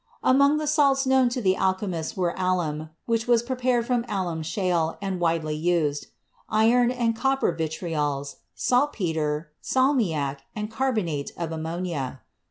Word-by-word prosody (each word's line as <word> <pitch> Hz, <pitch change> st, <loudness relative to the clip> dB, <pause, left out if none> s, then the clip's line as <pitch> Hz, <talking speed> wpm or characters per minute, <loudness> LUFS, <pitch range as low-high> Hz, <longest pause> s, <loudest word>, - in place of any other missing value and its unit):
Among 280 Hz, +3 st, +5 dB
the 305 Hz, -, -2 dB
salts 280 Hz, -3 st, +3 dB
known 260 Hz, -1 st, +4 dB
to 245 Hz, +1 st, -3 dB
the 190 Hz, -1 st, +3 dB
alchemists 190 Hz, -4 st, -1 dB
were 175 Hz, -2 st, 0 dB
alum, 170 Hz, -4 st, -1 dB, 0.2 s
which 230 Hz, 0 st, 0 dB
was 240 Hz, -1 st, +4 dB
prepared 250 Hz, -1 st, 0 dB
from 245 Hz, -1 st, +1 dB
alum 180 Hz, -5 st, -2 dB
shale 170 Hz, -1 st, 0 dB
and 195 Hz, -2 st, -3 dB
widely 165 Hz, -2 st, 0 dB
used; 155 Hz, -3 st, 0 dB, 0.4 s
iron 235 Hz, +3 st, +4 dB
and 240 Hz, -2 st, 0 dB
copper 270 Hz, -2 st, +1 dB
vitriols; 155 Hz, -4 st, -3 dB, 0.2 s
saltpeter, 160 Hz, -, 0 dB
salmiac 185 Hz, -, +1 dB, 0.2 s
and 210 Hz, 0 st, -4 dB
carbonate 215 Hz, -, -1 dB
of 170 Hz, -2 st, -3 dB
ammonia. 160 Hz, -5 st, -4 dB
185 Hz, 135 wpm, -25 LUFS, 160-245 Hz, 0.4 s, Among